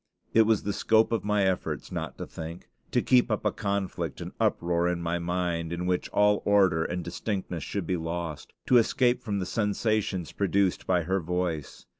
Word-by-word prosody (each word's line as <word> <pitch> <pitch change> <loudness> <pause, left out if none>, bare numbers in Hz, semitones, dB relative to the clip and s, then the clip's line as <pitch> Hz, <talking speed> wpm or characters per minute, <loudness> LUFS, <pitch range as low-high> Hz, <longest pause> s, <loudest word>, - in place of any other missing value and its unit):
It 110 -1 +5
was 110 -3 +2
the 100 - -1
scope 110 +2 +3
of 115 -3 0
my 105 -1 +2
efforts 95 -1 -1
not - - -4
to - - -5
think; 80 +1 -8 0.2
to - - +1
keep 125 -1 +4
up 110 -1 -1
a 105 - +3
conflict 100 -2 -3
and - - -6
uproar 85 0 +1
in 90 -1 0
my 85 0 -1
mind 85 -1 -2
in 85 +1 -3
which 90 0 0
all 105 0 +3
order 95 -5 +4
and 90 +1 -3
distinctness 90 -1 -3
should 100 -4 -3
be 90 +2 0
lost; 80 -3 -5
to 125 - +5
escape 120 +1 +3
from 105 -3 -2
the 95 - -2
sensations 105 -3 -1
produced 100 -1 0
by 90 -2 +2
her 95 +4 0
voice. 85 -3 -3
95 Hz, 190 wpm, -28 LUFS, 85-105 Hz, 0.2 s, It